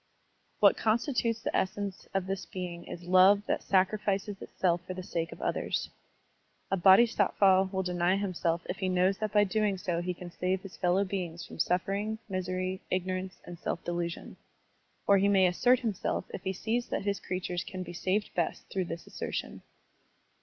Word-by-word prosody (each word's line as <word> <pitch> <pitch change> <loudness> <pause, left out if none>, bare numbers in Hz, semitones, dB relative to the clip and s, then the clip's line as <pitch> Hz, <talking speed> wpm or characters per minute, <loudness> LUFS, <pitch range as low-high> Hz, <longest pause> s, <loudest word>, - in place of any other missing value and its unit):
What - - +6
constitutes 230 0 +1
the - - -2
essence 195 0 -2
of 195 -1 +1
this 195 0 -4
being 175 -2 -6
is 175 - -8
love 185 +3 +5
that - - 0
sacrifices 195 +1 +1
itself 175 -2 0
for 185 +1 -7
the 185 - -6
sake 165 -2 -3
of - - -8
others. - - -1 0.8
A - - +4
Bodhisattva 190 -1 +5
will 190 -1 -1
deny 180 0 +1
himself 180 -3 -1
if 180 - -3
he 190 -2 -1
knows 185 +1 +2
that 215 -2 -2
by 205 0 +5
so 200 - -3
doing 210 -1 +1 0.2
he 180 0 -3
can 175 0 -9
save 185 +2 -1
his 195 - -9
fellow 180 +2 +2
beings 180 -3 -4
from - - -11
suffering, 200 +4 0
misery, 185 -1 -2
ignorance, 185 0 -2
and 175 -1 -9
self 170 - -3
delusion. 170 0 -4 0.7
Or 200 -1 +5
he 200 - +3
may 195 -2 +5
assert 245 +8 +3
himself 220 -6 -2
if - - -5
he 190 - -2
sees 230 +6 -1
that - - -3
his 200 -2 0
crea 185 0 -3
tures 175 -1 -3
can 185 -1 -6
be 175 0 -8
saved 190 +4 -1
best 170 - -2
through 190 -2 -1
this 165 0 -6
assertion. - - -5
185 Hz, 180 wpm, -30 LUFS, 180-200 Hz, 0.8 s, What